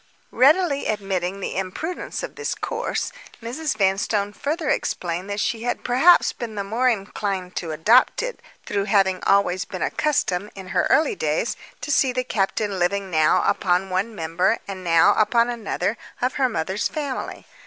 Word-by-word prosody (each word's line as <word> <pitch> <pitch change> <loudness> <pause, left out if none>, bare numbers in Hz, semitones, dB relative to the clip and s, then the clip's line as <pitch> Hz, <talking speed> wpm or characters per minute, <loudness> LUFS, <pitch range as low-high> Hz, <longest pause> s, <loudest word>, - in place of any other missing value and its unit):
Readily 285 +2 +3
admitting 195 -2 -2
the - - -4
imprudence 195 - -4
of - - -5
this 450 - -3
course, 470 +1 -3 0.3
Mrs. 245 +3 -3
Vanstone 200 +1 +1
further 310 - -3
explained 175 -3 -2
that 205 +1 -3
she 225 +2 -1
had 245 +1 -2
perhaps 265 +9 +5
been 230 -3 -6
the 200 - -2
more 230 +6 +1
inclined 195 -4 -3
to 170 - -3
adopt 220 - +4
it - - -4 0.3
through 200 -1 -1
having 195 -2 +3
been - - -15
always 195 -2 +3
accustomed, 210 - -1
in 190 -1 -9
her 185 -1 +1
early 320 +8 +3
days, - - -1 0.3
to 300 - -3
see 270 -2 +3
the 255 0 -1
captain 200 -3 -1
living 190 +2 0
now 155 -2 +3
upon 185 0 +1
one 200 +5 -1
member, 170 +6 +1
and 190 -2 -6
now 165 -2 +5
upon 235 +3 +3
another, 230 -1 -2 0.2
of 250 +1 0
her 265 -3 +1
mother's 190 -1 -1
family. 285 -4 -5
205 Hz, 165 wpm, -23 LUFS, 190-255 Hz, 0.3 s, perhaps